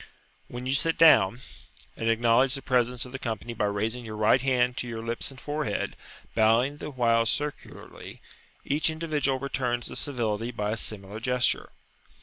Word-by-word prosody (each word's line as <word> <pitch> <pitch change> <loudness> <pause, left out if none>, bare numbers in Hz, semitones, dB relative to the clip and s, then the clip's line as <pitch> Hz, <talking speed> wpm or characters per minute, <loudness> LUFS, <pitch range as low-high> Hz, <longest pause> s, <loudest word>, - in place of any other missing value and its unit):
Then 125 +1 -7
you 130 - 0
sit 160 +4 +1
down, 125 -9 +6 0.5
and 115 - -1
acknowledge 120 +3 +3
the 135 - -7
presence 125 -1 +1
of 125 - -11
the 135 - -6
company 115 0 -4
by 105 -2 -1
raising 110 +4 -2
your 110 -2 -7
right 110 +4 +3
hand 125 -2 +1
to 125 - -3
your 115 -1 -5
lips 115 0 -2
and 135 -1 -11
forehead, 150 +1 -3 0.4
bowing 115 +6 +3
the 150 - -6
while 115 -4 +2
circularly; 145 +3 -5 0.5
each 150 +3 +2
individual 155 -4 -1
returns 125 -3 -2
the - - -7
civility 115 -5 -2
by 105 -3 -2
a 110 - -2
similar 105 -1 -4
gesture. 125 +1 +1
125 Hz, 165 wpm, -27 LUFS, 115-135 Hz, 0.5 s, down